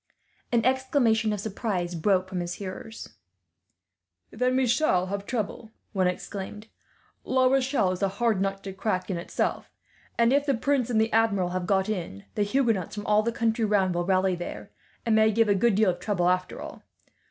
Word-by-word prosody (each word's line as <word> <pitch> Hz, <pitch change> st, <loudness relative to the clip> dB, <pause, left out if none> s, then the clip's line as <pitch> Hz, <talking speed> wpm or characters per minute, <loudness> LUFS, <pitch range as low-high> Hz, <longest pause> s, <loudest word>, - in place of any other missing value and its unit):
An 235 Hz, -2 st, +2 dB
exclamation 255 Hz, -4 st, +2 dB
of 210 Hz, -, -2 dB
surprise 195 Hz, -4 st, -3 dB
broke 185 Hz, +2 st, +1 dB
from 185 Hz, -1 st, -4 dB
his 175 Hz, 0 st, -3 dB
hearers. 200 Hz, +3 st, -8 dB, 1.2 s
"Then 250 Hz, +2 st, 0 dB
we 260 Hz, -, +3 dB
shall 235 Hz, -7 st, +2 dB
have 200 Hz, +1 st, -5 dB
trouble," 220 Hz, -2 st, -3 dB, 0.2 s
one 190 Hz, -2 st, +2 dB
exclaimed. 195 Hz, +3 st, -5 dB, 0.6 s
"La 260 Hz, 0 st, +2 dB
Rochelle 260 Hz, -6 st, +2 dB
is 185 Hz, -, -5 dB
a 195 Hz, -, +3 dB
hard 205 Hz, +1 st, 0 dB
nut 195 Hz, 0 st, -2 dB
to 195 Hz, -, -6 dB
crack, 195 Hz, -1 st, -2 dB
in 180 Hz, -, -2 dB
itself; 170 Hz, -, -2 dB, 0.5 s
and 235 Hz, +2 st, +4 dB
if 285 Hz, +1 st, +2 dB
the 275 Hz, -, +3 dB
prince 260 Hz, 0 st, 0 dB
and 225 Hz, -3 st, +2 dB
the 220 Hz, 0 st, +1 dB
Admiral 205 Hz, -5 st, +2 dB
have 180 Hz, 0 st, -3 dB
got 190 Hz, -1 st, +2 dB
in, 170 Hz, -, -4 dB
the 210 Hz, -, -2 dB
Huguenots 215 Hz, -4 st, 0 dB
from 205 Hz, -, -6 dB
all 210 Hz, 0 st, +4 dB
the 235 Hz, +2 st, -1 dB
country 230 Hz, 0 st, 0 dB
round 200 Hz, -4 st, +2 dB
will 175 Hz, 0 st, 0 dB
rally 185 Hz, +1 st, +2 dB
there, 175 Hz, 0 st, -6 dB, 0.3 s
and 230 Hz, -, +2 dB
may 220 Hz, 0 st, +5 dB
give 225 Hz, +1 st, +3 dB
a -, -, +5 dB
good 200 Hz, +2 st, +2 dB
deal 210 Hz, -2 st, +4 dB
of 175 Hz, -, -8 dB
trouble, 180 Hz, -3 st, +1 dB
after 180 Hz, 0 st, -1 dB
all. -, -, -8 dB
210 Hz, 190 wpm, -26 LUFS, 185-230 Hz, 1.2 s, may